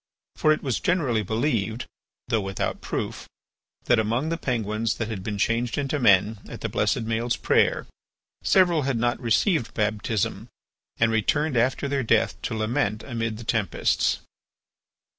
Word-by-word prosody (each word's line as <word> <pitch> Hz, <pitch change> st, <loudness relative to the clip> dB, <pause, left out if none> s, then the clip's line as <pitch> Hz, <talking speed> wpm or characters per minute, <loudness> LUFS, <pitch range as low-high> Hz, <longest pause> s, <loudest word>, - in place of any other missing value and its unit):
For 155 Hz, -, +3 dB
it 155 Hz, -, +1 dB
was 130 Hz, -6 st, -1 dB
generally 145 Hz, -11 st, +1 dB
believed, 110 Hz, +1 st, -1 dB, 0.4 s
though 110 Hz, -, +1 dB
without 95 Hz, -1 st, -3 dB
proof, -, -, -4 dB, 0.5 s
that 120 Hz, -, +3 dB
among 115 Hz, +8 st, 0 dB
the 165 Hz, -, 0 dB
Penguins 115 Hz, -6 st, -1 dB
that 115 Hz, -1 st, -3 dB
had 105 Hz, -4 st, -4 dB
been 105 Hz, +1 st, -4 dB
changed 115 Hz, +3 st, 0 dB
into 145 Hz, +1 st, -1 dB
men 105 Hz, -2 st, +4 dB
at -, -, -8 dB
the -, -, -2 dB
blessed 115 Hz, -, 0 dB
Maël's 115 Hz, +1 st, 0 dB
prayer, -, -, +2 dB, 0.6 s
several 175 Hz, -4 st, +4 dB
had 135 Hz, -3 st, 0 dB
not 120 Hz, +1 st, 0 dB
received 125 Hz, -, +1 dB
baptism 105 Hz, 0 st, -1 dB, 0.5 s
and 115 Hz, 0 st, +3 dB
returned 140 Hz, +7 st, +1 dB
after 125 Hz, +4 st, +1 dB
their 140 Hz, -1 st, 0 dB
death 115 Hz, -, +1 dB
to 110 Hz, -, -3 dB
lament 110 Hz, -1 st, -1 dB
amid 115 Hz, -4 st, -3 dB
the 115 Hz, -, -8 dB
tempests. 110 Hz, -4 st, 0 dB
115 Hz, 150 wpm, -25 LUFS, 110-135 Hz, 0.6 s, men